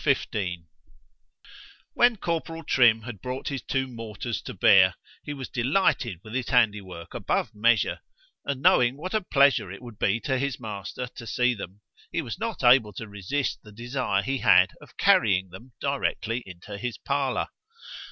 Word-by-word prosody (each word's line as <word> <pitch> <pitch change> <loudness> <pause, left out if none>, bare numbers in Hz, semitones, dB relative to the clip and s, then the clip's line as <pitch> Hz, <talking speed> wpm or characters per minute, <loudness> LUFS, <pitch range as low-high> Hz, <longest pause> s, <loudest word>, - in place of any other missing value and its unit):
XV 140 -5 +1 1.6
WHEN 240 -1 +4
Corporal 165 -2 -3
Trim 115 -6 +4
had 110 -5 -8
brought 125 +3 -4
his 140 -3 -4
two 135 -1 -1
mortars 115 -2 -5
to - - -7
bear, 95 -2 +6 0.3
he - - -6
was 135 -3 -6
delighted 120 - 0
with 110 - -11
his 130 -1 -2
handy 110 -4 +3
work 90 -3 -10
above - - -1
measure; 110 +1 +2 0.4
and 140 -1 -4
knowing 125 +2 +4
what 185 +7 -6
a 215 - +2
pleasure 140 - +3
it 100 - -8
would 120 -4 -12
be 100 +4 +2
to 130 -2 -1
his 140 -2 -2
master 105 +1 -5
to 120 -1 -11
see 125 +1 +2
them, 100 -2 -9 0.3
he 170 - -1
was 120 - -6
not 225 -9 -4
able 120 -4 +5
to 110 +4 -7
resist 105 +8 -2
the 105 - -14
desire 120 -2 -1
he 135 0 -1
had 90 0 +5
of - - -17
carrying 95 -4 +3
them 115 +8 -12
directly 125 -4 -1
into 95 +3 -9
his 120 0 -4
parlour. 140 -2 -1
120 Hz, 170 wpm, -26 LUFS, 105-135 Hz, 1.6 s, bear